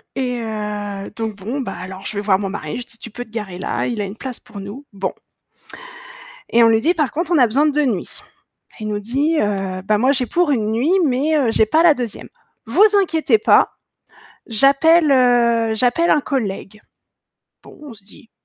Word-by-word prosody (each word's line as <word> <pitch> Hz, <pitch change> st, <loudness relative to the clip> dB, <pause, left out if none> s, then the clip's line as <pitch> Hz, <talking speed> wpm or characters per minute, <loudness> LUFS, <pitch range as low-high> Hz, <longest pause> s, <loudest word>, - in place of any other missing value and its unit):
Et 250 Hz, -2 st, -2 dB
heu, 210 Hz, -2 st, -5 dB
donc 225 Hz, -2 st, -4 dB
bon, 230 Hz, +9 st, -4 dB
bah 255 Hz, -, -5 dB
alors 185 Hz, +2 st, -9 dB
je 210 Hz, -, -5 dB
vais -, -, -1 dB
voir 200 Hz, -2 st, +2 dB
mon 195 Hz, 0 st, -4 dB
mari, 155 Hz, -6 st, -5 dB
je 245 Hz, -, -7 dB
dis: 230 Hz, -, -17 dB
«Tu 230 Hz, -, -10 dB
peux 245 Hz, +4 st, -6 dB
te 245 Hz, -, -23 dB
garer 210 Hz, -5 st, -6 dB
là, -, -, -2 dB
il 235 Hz, -4 st, -3 dB
a 200 Hz, -, -2 dB
une 195 Hz, +3 st, -8 dB
place 255 Hz, -1 st, -7 dB
pour 210 Hz, -2 st, -11 dB
nous», 205 Hz, +9 st, -9 dB
bon. 195 Hz, -1 st, -3 dB, 1.4 s
Et 235 Hz, 0 st, +4 dB
on 230 Hz, -, +6 dB
lui 225 Hz, 0 st, +3 dB
dit: 330 Hz, +7 st, +2 dB
«Par 300 Hz, -6 st, -1 dB
contre 335 Hz, +2 st, -3 dB
on 340 Hz, -, +4 dB
a 250 Hz, -, +6 dB
besoin 275 Hz, +7 st, +2 dB
de 300 Hz, -, +2 dB
2 300 Hz, 0 st, +1 dB
nuits». 215 Hz, -9 st, -3 dB, 0.6 s
Il 215 Hz, -, -5 dB
nous 210 Hz, -1 st, -2 dB
dit, 275 Hz, +10 st, -1 dB
heu: 195 Hz, -4 st, -2 dB
«Bah 210 Hz, +1 st, +2 dB
moi 255 Hz, +6 st, +3 dB
j'ai 260 Hz, -2 st, 0 dB
pour 345 Hz, +4 st, +1 dB
1 220 Hz, -5 st, 0 dB
nuit, 245 Hz, +9 st, 0 dB
mais 290 Hz, +4 st, +1 dB
heu, 255 Hz, -6 st, +1 dB
j'ai 220 Hz, -, +3 dB
pas 315 Hz, +10 st, +2 dB
la 340 Hz, -3 st, +6 dB
2e. 245 Hz, -6 st, -6 dB, 0.4 s
Vous 270 Hz, -, +3 dB, 0.2 s
inquiétez 320 Hz, -, +2 dB
pas, 215 Hz, -, +4 dB, 0.8 s
j'appelle, 280 Hz, +7 st, +4 dB
heu, 235 Hz, -3 st, +3 dB
j'appelle 250 Hz, +9 st, +1 dB
un 300 Hz, -, +4 dB
collègue». 215 Hz, -6 st, -4 dB, 0.8 s
Bon, -, -, -15 dB
on 285 Hz, -6 st, -10 dB
se 200 Hz, -2 st, -17 dB
dit: 215 Hz, +2 st, -16 dB
230 Hz, 210 wpm, -19 LUFS, 210-275 Hz, 1.4 s, on